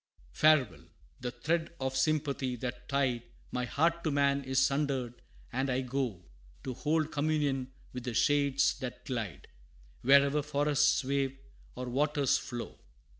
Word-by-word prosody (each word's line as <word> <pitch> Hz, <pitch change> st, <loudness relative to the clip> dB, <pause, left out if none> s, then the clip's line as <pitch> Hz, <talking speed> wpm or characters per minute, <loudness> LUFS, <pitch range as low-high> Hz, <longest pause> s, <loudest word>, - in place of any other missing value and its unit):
XIX. -, -, -16 dB
"Farewell! 155 Hz, -6 st, +4 dB, 0.3 s
the 125 Hz, -, -3 dB
thread 160 Hz, +7 st, -2 dB
of 130 Hz, 0 st, -2 dB
sympathy 140 Hz, -3 st, 0 dB
that 125 Hz, 0 st, -6 dB
tied 135 Hz, -4 st, +1 dB, 0.3 s
My 125 Hz, 0 st, -1 dB
heart 170 Hz, +6 st, +1 dB
to 160 Hz, -, +1 dB
man 140 Hz, -1 st, +2 dB
is 130 Hz, 0 st, -3 dB
sundered, 135 Hz, -3 st, +1 dB, 0.3 s
and 135 Hz, +2 st, 0 dB
I 130 Hz, +1 st, +1 dB
go 125 Hz, -8 st, -3 dB, 0.4 s
To 130 Hz, -, -3 dB
hold 155 Hz, +4 st, 0 dB
communion 145 Hz, -3 st, 0 dB, 0.2 s
with 125 Hz, -1 st, -6 dB
the 120 Hz, -2 st, -3 dB
shades 140 Hz, 0 st, +3 dB
that 125 Hz, -2 st, -6 dB
glide, 105 Hz, -, -4 dB, 0.5 s
Wherever 140 Hz, +2 st, +5 dB
forests 145 Hz, 0 st, +2 dB
wave, 135 Hz, 0 st, 0 dB, 0.4 s
or 125 Hz, 0 st, -5 dB
waters 140 Hz, +2 st, +2 dB
flow. 120 Hz, -1 st, -7 dB
135 Hz, 140 wpm, -31 LUFS, 125-145 Hz, 0.5 s, Wherever